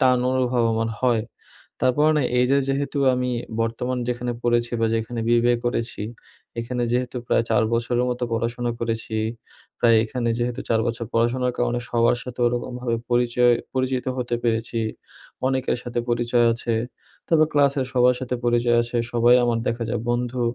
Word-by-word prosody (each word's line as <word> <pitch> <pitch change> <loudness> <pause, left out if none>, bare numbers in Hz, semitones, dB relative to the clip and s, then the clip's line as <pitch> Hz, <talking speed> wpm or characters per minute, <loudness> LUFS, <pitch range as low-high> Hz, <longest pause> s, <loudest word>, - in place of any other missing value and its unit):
টান 125 -1 +4
অনুভব 125 -2 +1
আমার 115 0 -1
হয়। 120 -3 +3 0.6
তারপরও 150 +5 +3
না, 145 - +2 0.2
এইযে 130 +3 +3
যেহেতু 140 +1 -1 0.2
আমি 125 0 -1 0.3
বর্তমান 125 +3 -2
যেখানে 120 0 -2
পড়েছি, 120 0 +1
বা - - +4
যেইখানে 115 +1 -2
BBA 120 +1 +4
করেছি, 115 -3 -2 0.6
এখানে 120 +1 -2
যেহেতু 125 0 -1
প্রায় 115 - +2
৪ 120 - +3
বছরের 120 +1 +1
মতো 125 0 -3
পড়াশোনা 120 +1 -1
করেছি। 115 -1 -3 0.7
তাই 115 -1 +5
এখানে 120 +1 -2
যেহেতু 120 +1 -2
৪ 115 -1 +3
বছর 115 0 -3
পড়াশোনার 120 +2 +1
কারণে 120 0 0
সবার 120 +1 +3
সাথে 125 -1 -9
ওরকমভাবে 120 0 -2
পরিচয় 120 0 +3 0.2
পরিচিত 130 0 -1
হতে 120 -1 -1
পেরেছি, 115 0 0 0.7
অনেকের 130 -1 0
সাথে 120 0 -3
পরিচয় 120 0 +2
আছে। 115 0 -2 0.6
তবে 160 -2 +5
ক্লাসের 140 -2 +3
সবার 125 0 +4
সাথে 125 -1 -3
পরিচয় 120 0 +3
আছে, 120 +1 -3
সবাই 120 +1 +5
আমার 120 -1 +1
দেখা 115 0 -1
যায় 110 - -2
বন্ধু। 120 +1 -1
120 Hz, 155 wpm, -23 LUFS, 115-125 Hz, 0.7 s, তাই